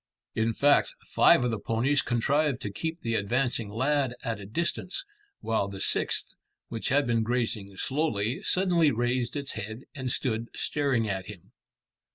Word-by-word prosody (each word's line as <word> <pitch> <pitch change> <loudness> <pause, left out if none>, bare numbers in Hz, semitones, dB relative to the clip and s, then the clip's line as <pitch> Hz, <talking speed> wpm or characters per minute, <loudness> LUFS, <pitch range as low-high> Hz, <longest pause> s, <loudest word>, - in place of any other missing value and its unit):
In 110 0 0
fact, 145 0 +4
five - - +5
of 125 - +1
the 110 - -2
ponies 125 +7 +1
contrived 140 +3 +1
to 105 - -3
keep 160 - -4
the 115 - -1
advancing 115 +1 0
lad 130 +3 +1
at 115 -2 -2
a 100 - -8
distance, 170 - -2 0.4
while 110 -3 0
the 100 -1 -7
sixth, - - +1 0.4
which 115 - -3
had 145 +2 +3
been 115 -1 +1
grazing 110 -4 -1
slowly, 130 -5 -1
suddenly 175 -4 +3
raised 120 +1 0
its 140 -1 -3
head 110 +2 -6
and 130 -4 -3
stood 115 -2 -1
staring 135 -6 0
at 95 -2 -3
him. 100 -5 -11
120 Hz, 160 wpm, -28 LUFS, 110-140 Hz, 0.4 s, five